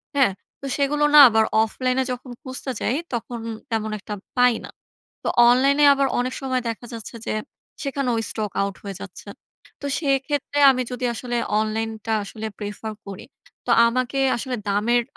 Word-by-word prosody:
হ্যাঁ? 270 Hz, -8 st, +4 dB, 0.3 s
তো -, -, -7 dB
সেগুলো 295 Hz, +1 st, +1 dB
না -, -, +11 dB
আবার 220 Hz, 0 st, +3 dB, 0.2 s
অফলাইন 255 Hz, +3 st, -1 dB
এ -, -, +1 dB
যখন 250 Hz, 0 st, -6 dB
খুঁজতে 260 Hz, 0 st, -4 dB
যাই, 245 Hz, -, 0 dB, 0.2 s
তখন 235 Hz, 0 st, -4 dB, 0.3 s
তেমন 220 Hz, -1 st, -1 dB
একটা 210 Hz, -, -7 dB, 0.2 s
পাই 250 Hz, -1 st, +5 dB
না। -, -, -11 dB, 0.5 s
তো -, -, -2 dB, 0.2 s
অনলাইনে 275 Hz, +4 st, +4 dB
আবার 275 Hz, 0 st, +2 dB
অনেক 255 Hz, +1 st, -1 dB
সময় 260 Hz, -2 st, -1 dB
দেখা 230 Hz, +1 st, -5 dB
যাচ্ছে 225 Hz, +1 st, -8 dB
যে, -, -, -1 dB, 0.5 s
সেখানেও 275 Hz, -4 st, -1 dB
স্টক 210 Hz, -3 st, -3 dB
আউট 200 Hz, -1 st, -3 dB
হয়ে 200 Hz, -2 st, -6 dB
যাচ্ছে। 200 Hz, +1 st, -10 dB, 0.5 s
তো 285 Hz, -, -4 dB
সেক্ষেত্রে 285 Hz, -1 st, -1 dB
আমি 255 Hz, -1 st, +1 dB
যদি 250 Hz, 0 st, -4 dB
আসলে 240 Hz, +1 st, -3 dB, 0.2 s
অনলাইনটা 220 Hz, 0 st, -2 dB
আসলে 220 Hz, +2 st, -6 dB
prefer 210 Hz, +1 st, -5 dB
করি, 195 Hz, -1 st, -8 dB, 0.4 s
তো -, -, -2 dB, 0.2 s
আমাকে 255 Hz, +3 st, -1 dB, 0.2 s
আসলে 250 Hz, +1 st, -3 dB
দামের 225 Hz, +4 st, +2 dB
245 Hz, 160 wpm, -23 LUFS, 220-265 Hz, 0.5 s, না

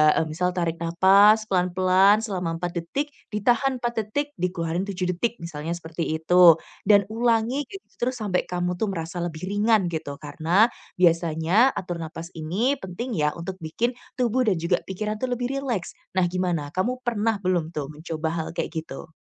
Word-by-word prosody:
eee, -, -, +2 dB
misal 180 Hz, +3 st, 0 dB
tarik 170 Hz, -2 st, -1 dB
napas 195 Hz, +6 st, +5 dB
pelan-pelan 185 Hz, +3 st, +4 dB
selama 180 Hz, -6 st, -2 dB
4 175 Hz, 0 st, -2 dB
detik, 270 Hz, -, -2 dB, 0.2 s
ditahan 245 Hz, +4 st, +1 dB
4 240 Hz, -1 st, -1 dB
detik, 285 Hz, +8 st, -2 dB
dikeluarin 175 Hz, 0 st, -1 dB
7 185 Hz, -2 st, -3 dB
detik 225 Hz, +7 st, -1 dB
misalnya 165 Hz, -1 st, -4 dB
seperti 165 Hz, -1 st, -5 dB, 0.2 s
itu 175 Hz, 0 st, +7 dB, 0.3 s
dan 200 Hz, 0 st, +6 dB
ulangi 235 Hz, +4 st, +1 dB
gitu 390 Hz, +5 st, -10 dB
terus 245 Hz, -1 st, -2 dB
sampai 195 Hz, -4 st, 0 dB
kamu 180 Hz, 0 st, -2 dB
tuh 220 Hz, -, 0 dB
merasa 170 Hz, -2 st, -5 dB
lebih 170 Hz, -1 st, -4 dB
ringan 205 Hz, -2 st, +2 dB
gitu. 155 Hz, -3 st, -4 dB
Karena 165 Hz, +9 st, +2 dB, 0.3 s
biasanya 170 Hz, +7 st, +3 dB
atur 175 Hz, -2 st, -4 dB
napas 165 Hz, +1 st, -7 dB
ini 200 Hz, -, 0 dB
penting 215 Hz, +5 st, -5 dB
ya 150 Hz, -1 st, +1 dB
untuk 180 Hz, +2 st, -6 dB
bikin 165 Hz, +10 st, -1 dB, 0.3 s
tubuh 250 Hz, +1 st, +2 dB
dan 200 Hz, -, +3 dB
juga 170 Hz, +1 st, +2 dB
pikiran 210 Hz, +3 st, -3 dB
tuh 255 Hz, -, -1 dB
lebih 245 Hz, 0 st, -2 dB
rileks. 245 Hz, -10 st, -3 dB, 0.2 s
Nah, 185 Hz, -1 st, +3 dB
gimana 175 Hz, -5 st, -1 dB
kamu 250 Hz, +7 st, -1 dB
pernah 225 Hz, -2 st, +1 dB
belum 175 Hz, -3 st, 0 dB
tuh 145 Hz, -2 st, -3 dB
mencoba 160 Hz, +1 st, -4 dB
hal 160 Hz, -, -2 dB
kayak -, -, -2 dB
gitu? 160 Hz, +1 st, -9 dB
185 Hz, 170 wpm, -24 LUFS, 170-220 Hz, 0.3 s, itu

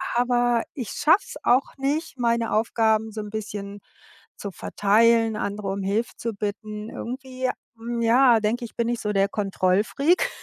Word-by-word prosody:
Aber 240 Hz, -1 st, +2 dB
ich 250 Hz, -7 st, -5 dB
schaffe 330 Hz, +7 st, +3 dB
es -, -, -9 dB
auch 255 Hz, +2 st, +2 dB
nicht, 285 Hz, +3 st, -2 dB
meine 235 Hz, -1 st, +1 dB
Aufgaben 220 Hz, 0 st, +1 dB
so 215 Hz, 0 st, -5 dB
'n 210 Hz, -, -7 dB
bisschen 205 Hz, -2 st, -6 dB, 0.6 s
zu 200 Hz, -, -6 dB
verteilen, 225 Hz, +4 st, +3 dB
andere 205 Hz, -1 st, -3 dB
um 195 Hz, +1 st, -3 dB
Hilfe 210 Hz, +5 st, 0 dB
zu 230 Hz, -1 st, -3 dB
bitten. 210 Hz, +1 st, -5 dB
Irgendwie, 255 Hz, +1 st, -4 dB, 0.3 s
hm, 235 Hz, +1 st, -4 dB
ja, 235 Hz, +1 st, +5 dB
denke 230 Hz, +3 st, -1 dB
ich, 230 Hz, -, -12 dB
bin 235 Hz, -, 0 dB
ich 240 Hz, -1 st, -1 dB
so 210 Hz, -, -1 dB
der 195 Hz, 0 st, +3 dB
Kontrollfreak, 210 Hz, -, +1 dB
225 Hz, 160 wpm, -24 LUFS, 210-245 Hz, 0.6 s, ja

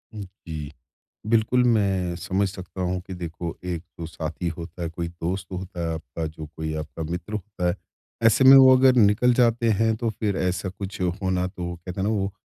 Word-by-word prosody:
जी। 85 Hz, -7 st, -7 dB, 0.6 s
बिल्कुल, 115 Hz, +3 st, +3 dB
मैं 95 Hz, -6 st, +2 dB
समझ 95 Hz, +3 st, 0 dB
सकता 95 Hz, -1 st, -9 dB
हूँ 90 Hz, 0 st, -1 dB
कि 95 Hz, -, -6 dB
देखो, 85 Hz, -1 st, -5 dB
एक 85 Hz, -2 st, -3 dB, 0.2 s
तो 85 Hz, -, -4 dB
साथी 80 Hz, +2 st, -4 dB
होता 85 Hz, +1 st, -7 dB
है, 85 Hz, -, -1 dB
कोई 85 Hz, +1 st, -4 dB
दोस्त 90 Hz, +2 st, -4 dB
होता 90 Hz, -1 st, -6 dB
है 85 Hz, -1 st, -1 dB
आपका, 80 Hz, 0 st, -5 dB
जो 80 Hz, 0 st, -7 dB
कोई 80 Hz, 0 st, -3 dB
आपका 75 Hz, +1 st, -6 dB
मित्र 90 Hz, +5 st, -5 dB
होता 100 Hz, -3 st, -3 dB
है। 85 Hz, -, +1 dB, 0.5 s
ऐसे 115 Hz, +4 st, +5 dB
में 135 Hz, +1 st, +10 dB
वो 130 Hz, -1 st, +9 dB
अगर 130 Hz, 0 st, +5 dB
निकल 110 Hz, +3 st, +5 dB
जाते 120 Hz, -1 st, +3 dB
हैं, 110 Hz, +2 st, +2 dB
तो 115 Hz, 0 st, -1 dB
फिर 105 Hz, -2 st, -2 dB
ऐसा 90 Hz, +1 st, -1 dB
कुछ 95 Hz, +1 st, -7 dB
होना 90 Hz, 0 st, 0 dB
तो, 90 Hz, -1 st, -8 dB
वो 85 Hz, 0 st, -4 dB
कहते 90 Hz, +2 st, -7 dB
हैं 95 Hz, -, 0 dB
ना, -, -, +1 dB
वो 100 Hz, -1 st, -1 dB
90 Hz, 200 wpm, -24 LUFS, 85-105 Hz, 0.6 s, में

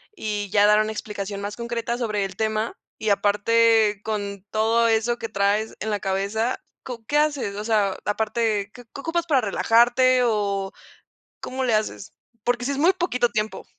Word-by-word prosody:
y 210 Hz, -, -3 dB
ya 205 Hz, 0 st, +4 dB
dar 210 Hz, +1 st, +5 dB
una 215 Hz, 0 st, -1 dB
explicación 205 Hz, -2 st, -5 dB
más 205 Hz, +1 st, -4 dB
concreta 235 Hz, 0 st, -3 dB
sobre 210 Hz, -5 st, -1 dB
el 190 Hz, -1 st, -7 dB
tema 220 Hz, +1 st, -1 dB, 0.2 s
y 220 Hz, -, -2 dB
aparte, 210 Hz, +1 st, +3 dB
con 200 Hz, -3 st, -4 dB
todo 225 Hz, +2 st, +2 dB
eso 225 Hz, +2 st, +1 dB
que 225 Hz, -, -5 dB
traes 200 Hz, +3 st, 0 dB
en 220 Hz, -, -3 dB
la 205 Hz, -1 st, -1 dB
cabeza, 200 Hz, +5 st, -1 dB, 0.2 s
¿cu 235 Hz, -3 st, -8 dB
qué 295 Hz, -, 0 dB
haces? 290 Hz, -9 st, 0 dB
O 210 Hz, -, -4 dB
sea, 210 Hz, -4 st, +1 dB
¿aparte 210 Hz, -1 st, 0 dB
qué 245 Hz, -, -12 dB
qué -, -, -8 dB
ocupas 335 Hz, +2 st, -1 dB
para 280 Hz, -6 st, +3 dB
relajarte 240 Hz, +4 st, +3 dB
o 200 Hz, -3 st, 0 dB, 0.7 s
cómo 260 Hz, +1 st, -4 dB
le 240 Hz, -3 st, +1 dB
haces? 215 Hz, -2 st, -2 dB, 0.3 s
Porque 245 Hz, 0 st, 0 dB
sí 280 Hz, -, 0 dB
es 275 Hz, -, -2 dB
muy 340 Hz, +6 st, +4 dB
poquito 295 Hz, -10 st, 0 dB
tiempo. 215 Hz, 0 st, -3 dB
220 Hz, 180 wpm, -23 LUFS, 205-240 Hz, 0.7 s, dar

